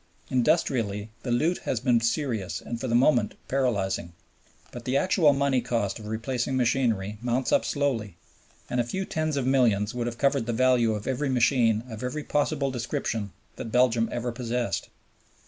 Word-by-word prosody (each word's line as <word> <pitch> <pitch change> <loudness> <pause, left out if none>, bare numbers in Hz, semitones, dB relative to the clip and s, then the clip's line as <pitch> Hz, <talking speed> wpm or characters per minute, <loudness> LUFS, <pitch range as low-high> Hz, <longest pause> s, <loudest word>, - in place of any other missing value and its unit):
Industrially, 110 -4 +1
the 125 - -5
loot 155 +9 +1
has 120 - -2
been 120 -1 +2
serious 115 -5 -1
and 115 -1 -6
for - - -2
the 115 - +1
moment 120 -3 +3
paralyzing; 100 -10 -1 0.6
but - - -8
the 130 +2 +1
actual 165 -1 +4
money 140 -2 +1
cost 115 -4 -1
of 105 - -9
replacing 120 +4 -2
machinery 115 -5 0
mounts 120 0 0
up - - +4
slowly, 120 - -1 0.5
and 125 - -1
a - - +3
few 190 +11 -3
tens 155 -3 -1
of 135 - 0
millions 115 -6 +2
would 120 -1 -2
have 120 -1 -4
covered 140 -3 +1
the 120 - 0
value 120 -2 +3
of 105 - -6
every 135 +2 -1
machine 120 -3 +3
of 110 -3 -8
every 130 +4 -3
possible 145 -2 0
description 115 -4 -3 0.3
that 115 - -6
Belgium 120 -1 +3
ever 120 0 -2
possessed. 120 0 -2
120 Hz, 170 wpm, -26 LUFS, 115-135 Hz, 0.6 s, actual